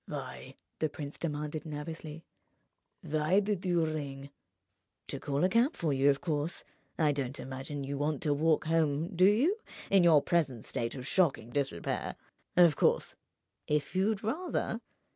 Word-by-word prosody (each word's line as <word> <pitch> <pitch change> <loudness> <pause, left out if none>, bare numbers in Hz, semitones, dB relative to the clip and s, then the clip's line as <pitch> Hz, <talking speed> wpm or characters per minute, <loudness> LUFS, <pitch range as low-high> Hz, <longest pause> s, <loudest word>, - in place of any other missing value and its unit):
"Why," - - -7 0.2
the 155 - +1
prince 145 -1 -7
demanded, 150 -1 -3
nervously—"why 155 +2 -4
did 205 -2 -1
you 175 -3 +2
ring?" 140 -3 -5 0.8
"To - - -4
call 140 +2 -1
a 185 - +4
cab 235 - +3
for 155 -4 0
you, 135 +1 +4
of 140 0 +2
course. 155 0 -2 0.3
I 155 -3 +3
don't 140 -1 -3
imagine 135 +2 -5
you 140 +1 -4
want 145 -1 -1
to 150 - +2
walk 155 +2 +2
home—do 165 +2 +2
you?—in 220 - +2
your 160 -4 +6
present 135 -10 0
state 115 +2 -3
of 130 -2 -6
shocking 140 -8 +1
disrepair. 135 -12 -2 0.4
Of 170 -5 +7
course, - - +2 0.5
if 150 +2 -1
you'd 195 +2 +1
rather 260 - -2
155 Hz, 140 wpm, -31 LUFS, 140-175 Hz, 0.8 s, Of